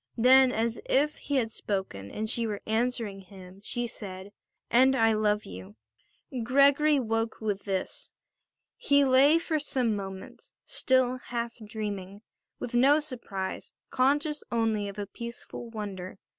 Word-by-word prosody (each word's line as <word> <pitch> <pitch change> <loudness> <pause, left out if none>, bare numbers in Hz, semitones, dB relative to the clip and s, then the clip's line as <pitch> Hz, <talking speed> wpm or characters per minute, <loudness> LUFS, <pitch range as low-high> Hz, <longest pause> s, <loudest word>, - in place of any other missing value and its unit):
Then, 260 +2 +6
as 230 0 -1
if 295 +3 +2
he 285 - -3
had 230 -4 +1
spoken 190 - -4
and 215 - -4
she 230 0 -1
were 205 -2 -4
answering 225 -2 -1
him, 190 0 -13
she 240 +2 -2
said: 195 -4 -7 0.4
"And 260 +2 +5
I 225 -2 +4
love 210 -1 +1
you." 95 +2 -10 0.7
Gregory 280 +4 +4
woke 225 -2 -1
with 205 -3 -3
this. 190 -2 -4 0.7
He 285 0 +3
lay 270 +4 +6
for 325 -2 -1
some 255 -6 0
moments 195 -1 -8
still 255 -1 +1
half 235 -1 -4
dreaming, 205 -2 -6 0.3
with 245 - -6
no 275 +5 +5
surprise, 235 -10 -6 0.2
conscious 290 +3 +1
only 220 -3 0
of 200 - -10
a 205 - -3
peaceful 235 +2 -8
wonder. 195 -4 -6
225 Hz, 140 wpm, -28 LUFS, 200-260 Hz, 0.7 s, Then